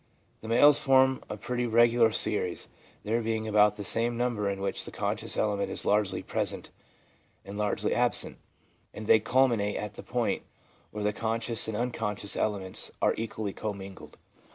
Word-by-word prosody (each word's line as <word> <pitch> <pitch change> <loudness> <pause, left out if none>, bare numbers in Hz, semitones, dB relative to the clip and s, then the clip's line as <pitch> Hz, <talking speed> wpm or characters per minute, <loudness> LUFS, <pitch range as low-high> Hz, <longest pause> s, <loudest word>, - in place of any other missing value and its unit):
The 110 - -9
males 140 +5 +6
form 130 -1 +4
a 105 - -5
pretty 125 +3 -2
regular 115 0 +4
series, 100 -4 -1 0.3
there 115 +3 0
being 110 -1 -2
about 105 -1 +4
the 105 - -6
same 115 +3 0
number 120 -4 0
in 100 0 -3
which 100 - -3
the - - -7
conscious - - -3
element 100 -2 0
is - - -4
largely 100 -2 +1
present - - -3 0.7
and 100 - -8
largely 105 0 0
absent, - - 0 0.6
and 110 - -6
they 110 - +6
culminate 115 -3 +2
at 105 0 -4
the - - -9
point - - -1 0.5
where 105 0 -5
the 105 0 +1
conscious 115 +1 -1
and 110 -1 -3
unconscious 105 -4 -2
elements 100 -3 -1
are - - +3
equally 110 -2 -4
commingled. 100 -3 -7
110 Hz, 160 wpm, -28 LUFS, 105-115 Hz, 0.7 s, males